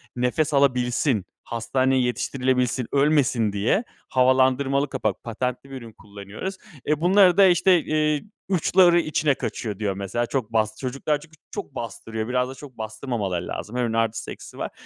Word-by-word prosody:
nefes 145 +5 0
alabilsin, 125 - +2 0.2
hastaneye 130 +3 0
yetiştirilebilsin, 125 0 0
ölmesin 140 -7 +2
diye 115 - +1 0.3
havalandırmalı 130 +2 +3
kapak, 110 -8 -2
patentli 125 +3 -4
bir 135 - -8
ürün 115 -2 -11
kullanıyoruz. 105 - -8 0.3
Eee, 150 +1 0
bunları 185 0 +5
da, 195 - +8
işte, 180 0 +4
eee, 150 -1 0 0.3
"Uçları 180 -1 +4
içine 155 -2 +1
kaçıyor." 105 -3 -4
diyor 100 -2 -1
mesela. 100 +5 -2
Çok 120 -3 -3
bast 110 -1 +1
çocuklar 140 +3 -1
çünkü 160 +1 -16 0.2
çok 135 - -7
bastırıyor, 115 -1 -5
biraz 125 0 0
da 135 - -8
çok 130 -2 -12
bastırmamaları 110 -5 -3
lazım. 110 - -6
Her - - +1
ürünün 115 -1 -1
artısı 115 0 -1
eksisi - - -11
var. - - -4
130 Hz, 155 wpm, -24 LUFS, 115-145 Hz, 0.3 s, da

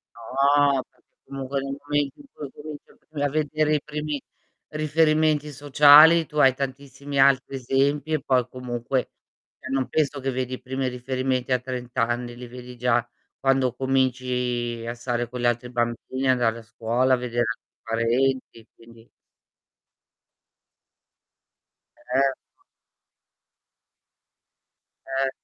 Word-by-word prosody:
No, 140 +3 +2
perché - - -34 0.2
comunque 135 0 -4
nel 135 0 -5
momento 145 -1 -1
in 290 - -14
cui 145 - -7
cominci 150 +1 -10
a - - -20 0.2
v 150 - -5
a 145 - +2
vedere 155 +1 +1
i 145 - 0
primi 150 -1 -4 0.5
riferimenti 155 -1 +2
sociali 145 +4 +7
tu 150 - -9
hai 135 -3 +6
tantissimi 140 +1 -5
altri 135 0 +4
esempi, 140 +4 0
e 155 - +1
poi 130 -3 +1
comunque 125 0 -3 0.5
cioè 130 - -8
non 135 -1 0
penso 145 -2 0
che 135 0 -2
vedi 130 0 -3
i 130 - -6
primi 130 +1 -3
riferimenti 130 0 -2
a 125 - +3
30 125 -1 -7
anni, 120 +1 -1
li 125 0 -9
vedi 125 0 -10
già 120 -1 +1 0.3
quando 135 -2 +2
cominci 125 -2 -1
a 120 - -2
stare 120 0 -3
con 125 0 -6
gli - - -1
altri 120 +1 0
bambini, 120 +2 -2
andare 120 -3 +2
a - - -11
scuola, 115 +3 +1
vedere 120 -1 -1
altri 115 - -7
parenti, 115 +1 -1
quindi 115 0 -18 2.9
Certo. 135 +1 -2 2.5
Eh. 135 0 0
130 Hz, 130 wpm, -24 LUFS, 125-140 Hz, 2.9 s, sociali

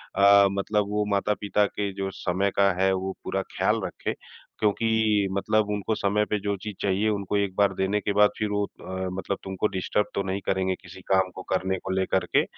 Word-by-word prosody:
अ, 100 0 +7
मतलब 100 +1 0
वो 105 0 +1
माता-पिता 105 +1 +1
के 100 0 -3
जो 95 0 -3
समय 95 +2 0
का 100 0 +5
है, 95 - +4
वो 95 0 -2
पूरा 95 - -1 0.2
ख़्याल - - +2
रखे। - - -4 0.5
क्योंकि 110 -1 +2
मतलब 110 +2 +1
उनको 105 +1 -1
समय 105 +1 +1
पे 105 - 0
जो 100 +1 -1
चीज़ 105 -2 -5
चाहिए 100 +2 +1
उनको 100 -1 -1
1 100 -2 -1
बार 100 -1 +3
देने 95 +3 +1
के 100 - -1
बाद 105 0 +6
फ़िर 105 -2 -1
वो 105 0 0
अ, 95 -1 -6
मतलब 95 +1 -3
तुमको 95 +2 -1
डिस्टर्ब 100 +2 -1
तो 100 - 0
नहीं 95 +1 -3
करेंगे 95 0 0
किसी 95 0 -12
काम 95 -1 +3
को 95 - -6
करने 95 0 0
को 95 - -3
लेकर 95 0 +1
के। - - +3
100 Hz, 205 wpm, -26 LUFS, 95-105 Hz, 0.5 s, अ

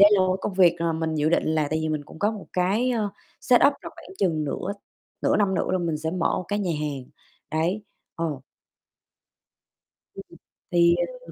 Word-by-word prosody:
đây 205 +1 +9
là 200 - +5
một 185 0 +3
cái - - -17
công - - -2
việc 180 -3 +5
mà 170 -1 +1
mình 160 0 -2
dự 150 0 +1
định 170 - +3
là 155 -2 +1
tại 155 - +1
vì 155 - -1
mình 155 -1 -2
cũng 155 - -13
có 205 +4 +2
một 210 - -8
cái, 200 +8 +1
ờ, 220 -4 0 0.3
setup 250 +3 +5
là - - -7
khoảng 385 - -13
chừng 160 -5 +1
nửa 175 +7 -3 0.5
nửa - - +3
năm 200 -2 +2
nữa - - 0
là 185 - +2
mình 165 -3 -1
sẽ 160 +1 -2
mở 180 - 0
một - - -5
cái 205 - 0
nhà 185 -4 0
hàng, 145 -4 -3 0.5
đấy. 170 +7 0 0.3
Ờ. 160 -5 -2 1.7
Ừm. - - -8
ừm. - - -21 0.4
Thì, 170 0 +5
ờm, - - -3
175 Hz, 215 wpm, -25 LUFS, 160-200 Hz, 1.7 s, đây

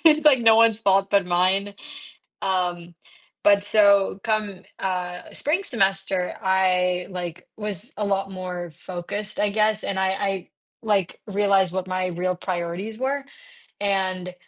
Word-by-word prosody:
it's, 310 -1 +5
like, 280 -4 +7
no 225 -1 +6
one's 225 -1 +4
fault 195 -2 +2
but 200 -3 +3
mine, 190 +3 +1 0.7
um, 175 -2 -1 0.5
but 200 -1 +5
so, 200 -2 +4
come, 215 -4 -1 0.2
uh, 180 -1 -3
spring 340 +7 -1
semester, 195 - 0
I 180 -2 +1
like, 175 -2 -6
was 210 0 -5
a 210 - -1
lot 195 -1 0
more 180 -2 -6
focused, 185 +5 -6
I 210 - +2
guess, 215 +1 +1
and 190 -1 -2
I 190 0 +2
I, 195 -1 -2 0.3
like, 200 -5 0
realized 195 -2 +2
what 185 -1 -3
my 185 0 -1
real 180 +1 -2
priorities 180 +4 -4
were, 270 +2 -2 0.6
and 185 -2 0
195 Hz, 140 wpm, -24 LUFS, 180-210 Hz, 0.7 s, like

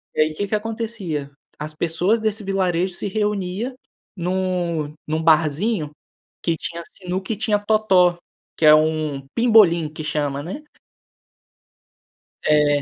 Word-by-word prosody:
E - - +3
aí, 155 0 +2
o - - -10
que 205 +5 -2
que 215 - 0
acontecia? 210 -9 -3 0.3
As 150 +1 -5
pessoas 175 +8 +1
desse 215 -1 -1
vilarejo 185 -2 0
se 205 - -1
reunia 210 +3 -2 0.4
num 175 -4 -1
num 155 +1 -1
barzinho 160 +2 +2 0.5
que 165 -1 +1
tinha 170 +1 -6
sinuca 190 +3 -4
e - - -4
tinha 215 -1 +1
totó 200 -5 +3 0.4
que 160 - +2
é 150 - +9
um 155 -3 +1
pimbolim 210 -9 +5
que 155 0 -7
chama, 145 -2 -1
né? 190 - -7 1.8
É, 150 -1 +4
175 Hz, 135 wpm, -22 LUFS, 155-205 Hz, 1.8 s, é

